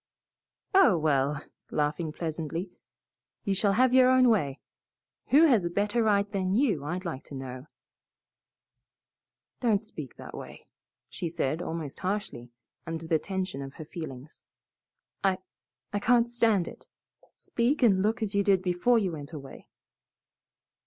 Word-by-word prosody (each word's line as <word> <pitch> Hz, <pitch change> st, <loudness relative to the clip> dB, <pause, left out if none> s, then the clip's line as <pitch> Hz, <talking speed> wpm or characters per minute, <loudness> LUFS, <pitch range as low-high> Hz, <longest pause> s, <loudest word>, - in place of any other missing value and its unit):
"Oh, 380 Hz, -, +6 dB
well!" 145 Hz, -2 st, +1 dB, 0.3 s
laughing 155 Hz, +2 st, -1 dB
pleasantly, 165 Hz, +3 st, -4 dB, 0.7 s
"you 200 Hz, -, 0 dB
shall 195 Hz, +1 st, +2 dB
have 255 Hz, +4 st, +3 dB
your 255 Hz, 0 st, +7 dB
own 255 Hz, -1 st, +5 dB
way. 145 Hz, -12 st, +1 dB, 0.7 s
Who 295 Hz, +4 st, +6 dB
has 240 Hz, -, +4 dB
a 170 Hz, -, -1 dB
better 205 Hz, +6 st, 0 dB
right 205 Hz, -2 st, +3 dB
than 190 Hz, -1 st, 0 dB
you, 220 Hz, -, +2 dB
I'd 180 Hz, +5 st, -4 dB
like 155 Hz, -6 st, -4 dB
to 140 Hz, -, -9 dB
know?" 130 Hz, +1 st, -7 dB, 1.9 s
"Don't 225 Hz, -4 st, +2 dB
speak 150 Hz, -, -9 dB
that -, -, -10 dB
way," -, -, -10 dB, 0.4 s
she 170 Hz, -, -4 dB
said, 160 Hz, 0 st, -1 dB
almost 160 Hz, -5 st, -5 dB
harshly, 185 Hz, -, -3 dB, 0.4 s
under 165 Hz, 0 st, -4 dB
the 160 Hz, -1 st, +2 dB
tension 185 Hz, -4 st, -3 dB
of 135 Hz, 0 st, -8 dB
her 155 Hz, -, -8 dB
feelings. 150 Hz, -3 st, -9 dB, 0.8 s
"I 190 Hz, -1 st, +3 dB, 0.6 s
I 205 Hz, -, +1 dB
can't 240 Hz, +2 st, +4 dB
stand 230 Hz, -6 st, +2 dB
it. -, -, -11 dB, 0.5 s
Speak 250 Hz, +4 st, 0 dB
and 195 Hz, -5 st, +5 dB
look 220 Hz, +3 st, 0 dB
as 210 Hz, -1 st, -3 dB
you 200 Hz, 0 st, +2 dB
did 190 Hz, -2 st, +3 dB
before 185 Hz, +7 st, +3 dB
you 195 Hz, -5 st, +1 dB
went 150 Hz, 0 st, -8 dB
away." 140 Hz, -3 st, -10 dB
185 Hz, 145 wpm, -28 LUFS, 155-215 Hz, 1.9 s, your